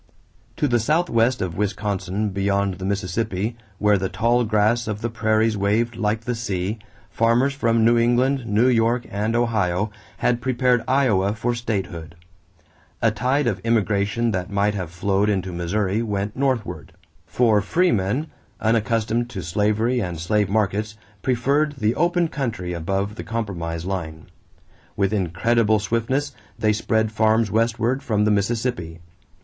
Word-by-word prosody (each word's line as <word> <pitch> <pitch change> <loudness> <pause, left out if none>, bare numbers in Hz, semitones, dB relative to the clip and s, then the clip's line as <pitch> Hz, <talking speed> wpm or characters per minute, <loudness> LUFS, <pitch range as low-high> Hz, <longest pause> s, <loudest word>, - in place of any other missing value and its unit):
= - - -35
To 150 - +1
the 120 -2 +2
southwest 125 - +1
of 85 -3 -4
Wisconsin 100 0 -2
beyond 100 0 0
the 95 - -4
Mississippi, 100 +2 -2 0.2
where 105 0 +3
the 95 0 -2
tall 120 +3 +2
grass 110 +2 +2
of 105 -1 -3
the 115 - -2
prairies 110 0 +1
waved 105 +4 0
like 105 +1 -1
the 120 +2 -2
sea, 105 -2 -3 0.3
farmers 120 +5 +2
from 115 -4 +2
New 120 +1 +4
England, 120 +2 +2
New 110 +4 +3
York, 120 0 +2
and 105 +3 -1
Ohio 105 -4 0 0.3
had 120 -1 +1
prepared 125 -1 +1
Iowa 110 -8 +2
for 120 +3 -1
statehood. 95 -8 -4 0.8
A 115 - +3
tide 130 +6 0
of 105 -5 0
immigration 110 +1 +1
that 90 -2 -3
might 100 +1 +1
have 90 -5 -4
flowed 95 +4 0
into 95 -3 -1
Missouri 95 +4 -1
went 105 -1 -2
northward; 130 -4 -2 0.3
for 110 -4 +3
freemen, 120 - +1 0.3
unaccustomed 115 +1 +1
to 95 -7 -6
slavery 105 +7 +1
and 90 -6 -3
slave 105 +3 +1
markets, 105 +1 -1 0.2
preferred 140 +4 +1
the 110 -5 0
open 175 +2 +1
country 115 - -3
above 95 +5 -2
the - - -5
compromise 85 -7 -4
line. 80 -5 -4 0.7
With 100 +1 +1
incredible 110 +4 +2
swiftness, 115 +7 -1 0.3
they 110 0 +2
spread 110 0 0
farms 110 -1 +2
westward 115 +3 +1
from 105 -5 +1
the 105 - +3
Mississippi. 105 -5 -1
110 Hz, 145 wpm, -22 LUFS, 100-120 Hz, 0.8 s, New